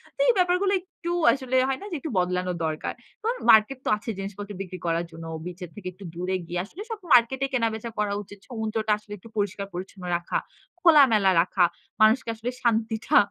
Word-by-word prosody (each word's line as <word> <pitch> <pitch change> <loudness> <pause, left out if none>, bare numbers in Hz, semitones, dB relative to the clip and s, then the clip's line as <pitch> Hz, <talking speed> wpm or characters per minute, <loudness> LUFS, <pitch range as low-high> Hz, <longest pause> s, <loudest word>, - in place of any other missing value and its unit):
তো - - -44
এই - - +6
ব্যাপারগুলো 365 +2 +3
একটু 345 -2 -7 0.2
আসলে 260 -1 -3
হয় 265 - -1
না - - -7
যে, - - -2
একটু 315 - -5
বদলানো 180 0 0
দরকার। 155 -1 -2 0.3
তো 440 - -3 0.2
মার্কেট 220 +5 +5
তো - - +1
আছে 215 +2 -8
জিনিসপত্র 200 +1 -6
বিক্রি 185 -2 -7
করার 165 +1 +1
জন্য। 165 0 -9 0.2
বিচের 180 -1 -7
থেকে 190 -3 -8
একটু 195 +2 -13
দূরে 180 +2 -1
গিয়ে। 175 +1 -2
আসলে 360 - -10
সব 440 - -4
মার্কেটে 255 +3 +5
কেনাবেচা 230 -2 0
করা 205 -1 +1
উচিত। 205 +1 -13
সমুদ্রটা 220 -2 -2
আসলে 210 0 -11
একটু 225 +5 -15
পরিষ্কার-পরিচ্ছন্ন 195 -2 -4
রাখা, 175 - -2 0.4
খোলামেলা 260 - +6
রাখা, 180 0 +3 0.4
মানুষকে 225 +2 +5
আসলে 235 +3 -3
শান্তিটা 225 -1 +2
215 Hz, 180 wpm, -26 LUFS, 185-255 Hz, 0.4 s, এই